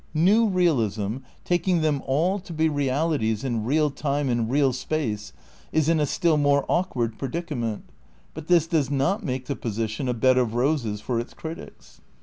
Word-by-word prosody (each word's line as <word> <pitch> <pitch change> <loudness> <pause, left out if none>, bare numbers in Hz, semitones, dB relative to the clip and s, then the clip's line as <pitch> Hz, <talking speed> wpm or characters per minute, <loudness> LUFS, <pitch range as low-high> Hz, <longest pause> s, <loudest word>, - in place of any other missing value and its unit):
New 205 +8 +4
realism, 120 - +1 0.3
taking 175 0 +1
them 150 -3 +1
all 170 +9 +1
to 180 -1 -12
be 160 0 +2
realities 140 -6 0
in 120 -5 -1
real 150 +3 +2
time 140 0 -1
and 120 -2 0
real 135 0 +2
space, 120 - -3 0.4
is 155 -1 +1
in 165 -1 +3
a 150 - +1
still 165 +1 +2
more 145 -1 +3
awkward 120 -11 -1
predicament, 135 -6 -3 0.5
but 150 - -9
this 175 -3 +4
does 160 -5 0
not 145 - 0
make 130 -5 -3
the 140 - -3
position 115 +3 -3
a 125 - 0
bed 130 +2 +4
of 115 -2 0
roses 120 -5 0
for 115 +2 -1
its 120 - -7
critics. 160 +1 -10
140 Hz, 170 wpm, -25 LUFS, 120-160 Hz, 0.5 s, New